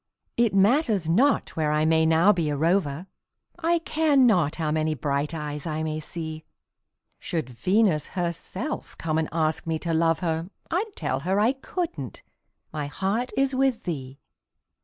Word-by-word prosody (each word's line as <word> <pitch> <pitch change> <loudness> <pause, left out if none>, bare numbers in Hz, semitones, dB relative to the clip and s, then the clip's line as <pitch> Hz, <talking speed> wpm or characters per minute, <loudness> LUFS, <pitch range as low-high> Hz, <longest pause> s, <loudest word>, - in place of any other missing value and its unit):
It 235 -4 +2
matters 210 - +3
not 245 - +2
where 155 -2 +1
I 150 +1 +2
may 160 0 +4
now 165 +6 +5
be 165 -5 -1
a 145 - -1
rover, 165 -1 +1 0.5
I 340 +1 +2
care 315 -3 +1
not 185 - +4
how 155 -3 -1
many 155 0 0
bright 140 +2 -1
eyes 150 -2 -5
I 155 0 -2
may 155 0 -2
see; 160 0 -6 0.8
Should 155 -7 -3
Venus 180 - +2
herself 180 - -4
come 160 -1 -1
and 160 - -1
ask 160 0 -1
me 160 -1 0
to 165 +1 -3
love 165 +1 +2
her, 165 0 -1 0.2
I'd 395 +5 -1
tell 130 - -2
her 185 +7 0
I 220 +4 +4
couldn't 270 - -5 0.5
my 150 -2 -3
heart 195 - -2
is 270 0 +2
with 260 -3 +1
thee. 135 -6 -5
165 Hz, 160 wpm, -25 LUFS, 155-220 Hz, 0.8 s, now